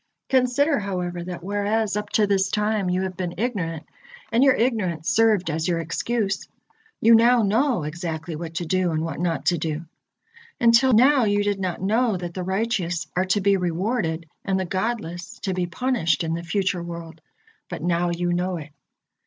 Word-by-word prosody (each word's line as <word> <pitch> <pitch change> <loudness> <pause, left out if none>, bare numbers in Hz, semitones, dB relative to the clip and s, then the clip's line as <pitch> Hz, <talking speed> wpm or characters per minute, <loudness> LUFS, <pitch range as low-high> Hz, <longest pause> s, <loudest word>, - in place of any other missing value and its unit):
Consider, 265 +3 +3
however, 180 -3 -3
that 175 -1 -6
whereas 205 +2 0
up 210 0 -3
to 215 - +4
this 195 -1 +1
time 210 -2 0
you 180 +1 0
have 185 -1 -4
been 180 -1 -4
ignorant, 180 -8 -2 0.5
and 235 +3 +4
your 270 -2 +5
ignorance 195 -11 0
served 215 -7 +3
as 160 +2 -1
your 175 -2 +1
excuse, 195 +5 -2 0.5
you 230 +1 +6
now 235 +1 +5
know 225 - +2
exactly 160 +1 -4
what 165 +1 -7
to 175 - -2
do 185 +1 +1
and 160 -1 -1
what 165 -1 -4
not 170 -1 -1
to 175 -2 +2
do. 160 +1 -3 0.7
Until 235 +3 +5
now 260 +2 +5
you 205 0 +2
did 205 -1 0
not 185 -1 -3
know 220 +1 +2
that 175 -1 -6
the 185 - -4
righteous 190 -3 -1
are 185 +1 +2
to 190 +2 +1
be 200 0 +3
rewarded 175 -1 -1 0.2
and 190 -1 0
the 190 - -1
godless 185 -2 -3
to 190 - -1
be 180 -1 -1
punished 175 - 0
in 165 0 -2
the 170 - -3
future 185 0 -1
world, 170 -1 -8 0.5
but - - -6
now 175 0 +1
you 175 0 -1
know 180 +1 -1
it. 155 -2 -9
185 Hz, 185 wpm, -24 LUFS, 170-220 Hz, 0.7 s, you